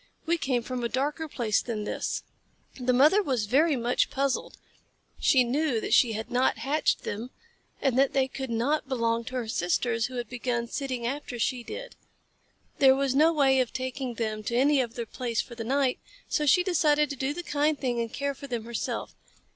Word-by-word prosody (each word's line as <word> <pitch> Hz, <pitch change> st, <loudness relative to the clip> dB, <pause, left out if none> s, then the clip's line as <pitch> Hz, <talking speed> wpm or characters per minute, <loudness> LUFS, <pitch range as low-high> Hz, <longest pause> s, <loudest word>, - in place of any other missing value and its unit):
We 335 Hz, +1 st, +1 dB
came 255 Hz, -5 st, 0 dB
from 250 Hz, 0 st, -4 dB
a 235 Hz, -, 0 dB
darker 295 Hz, +5 st, -1 dB
place 235 Hz, -7 st, 0 dB
than 220 Hz, -3 st, -4 dB
this." -, -, -3 dB, 0.6 s
The 250 Hz, 0 st, +1 dB
mother 300 Hz, +11 st, +5 dB
was 255 Hz, -, -1 dB
very 290 Hz, +8 st, +3 dB
much 240 Hz, 0 st, +1 dB
puzzled. 275 Hz, -1 st, -1 dB, 0.6 s
She 260 Hz, -2 st, +5 dB
knew 260 Hz, 0 st, 0 dB
that -, -, -2 dB
she 235 Hz, -3 st, +5 dB
had 220 Hz, +3 st, -5 dB
not 250 Hz, +2 st, +2 dB
hatched 295 Hz, +3 st, 0 dB
them, 220 Hz, +4 st, -4 dB, 0.5 s
and 265 Hz, -2 st, +1 dB
that 275 Hz, 0 st, +3 dB
they 265 Hz, -1 st, +2 dB
could 265 Hz, 0 st, -6 dB
not 265 Hz, +6 st, 0 dB
belong 230 Hz, -2 st, 0 dB
to 255 Hz, -, -6 dB
her 245 Hz, -3 st, -2 dB
sisters, 225 Hz, +4 st, 0 dB
who 255 Hz, -, -9 dB
had 240 Hz, -1 st, -3 dB
begun 240 Hz, -1 st, -2 dB
sitting 255 Hz, -2 st, -3 dB
after 255 Hz, -1 st, -4 dB
she 245 Hz, +2 st, 0 dB
did. -, -, -8 dB, 0.8 s
There 265 Hz, -2 st, +7 dB
was 275 Hz, -1 st, 0 dB
no 310 Hz, +4 st, +5 dB
way 275 Hz, -4 st, +3 dB
of 255 Hz, -2 st, 0 dB
taking 260 Hz, -1 st, -4 dB
them 215 Hz, -2 st, -2 dB
to 235 Hz, -, -2 dB
any 275 Hz, +2 st, +4 dB
other 235 Hz, -1 st, -4 dB
place 235 Hz, -1 st, -3 dB
for 240 Hz, -, -3 dB
the 230 Hz, -1 st, -5 dB
night, 265 Hz, +2 st, +1 dB, 0.3 s
so 300 Hz, -, 0 dB
she 360 Hz, +6 st, +5 dB
decided 300 Hz, -5 st, +2 dB
to -, -, -4 dB
do 265 Hz, +1 st, -1 dB
the 350 Hz, +4 st, -5 dB
kind 295 Hz, -1 st, +1 dB
thing 245 Hz, -3 st, -1 dB
and 230 Hz, -1 st, -2 dB
care 280 Hz, 0 st, -2 dB
for 280 Hz, +1 st, -10 dB
them 240 Hz, -4 st, -4 dB
herself. 235 Hz, -1 st, -4 dB
255 Hz, 200 wpm, -27 LUFS, 235-280 Hz, 0.8 s, There